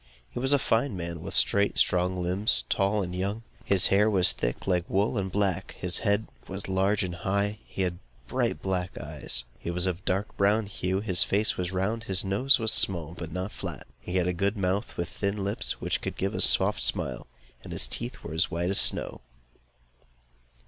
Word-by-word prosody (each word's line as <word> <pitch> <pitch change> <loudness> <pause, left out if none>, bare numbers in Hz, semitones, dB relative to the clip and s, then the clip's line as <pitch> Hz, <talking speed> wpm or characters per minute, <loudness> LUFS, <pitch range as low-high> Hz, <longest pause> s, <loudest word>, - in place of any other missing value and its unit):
He - - -4
was 135 +2 0
a 145 - +6
fine 115 -3 +1
man, 85 -1 -5
with - - -5
straight 100 0 +3
strong 90 0 +2
limbs, 90 - +1
tall, 100 +1 +2
and 90 0 -5
young. 100 +5 -2 0.2
His 95 -2 +3
hair 105 +2 +5
was 95 -4 +4
thick, - - -3
like 90 -2 0
wool, 100 +5 +1
and 95 -3 -1
black. 100 -4 -1
His 90 -1 0
head 100 0 +1 0.2
was 95 0 -5
large 95 +2 +2
and 90 -1 -3
high; 95 +3 0
and 105 +1 -4
he 95 - -2
had 90 -1 -2 0.3
bright - - -1
black 95 -1 -2
eyes. - - -4 0.2
He - - -5
was 90 +1 +2
of 90 -2 -1
a - - -27
dark 95 +3 -1
brown 105 +2 +3
hue; 95 -1 -2
his 95 -5 +4
face 105 +2 +2
was 90 0 -3
round, 95 +5 -1
and - - -12
his 95 -1 +1
nose 125 +9 +3
small, 85 -4 +1
but 85 -2 -7
not 90 +4 -3
flat; - - -7
he 90 - -6
had 90 -2 +2
a 90 - +1
good 100 +4 0
mouth 95 +1 -1
with 85 - -1
thin 100 +2 -2
lips, 100 +1 -1
with - - -27
which - - 0
he - - -20
could - - -5
give 95 +1 -1
a - - -1
soft 65 - +3
smile; - - -1 0.4
and - - -9
his - - +1
teeth 120 +1 -4
were 75 - -6
as 80 +2 +2
white 85 +2 -1
as 100 - +3
snow. - - +1
95 Hz, 215 wpm, -28 LUFS, 90-100 Hz, 0.4 s, a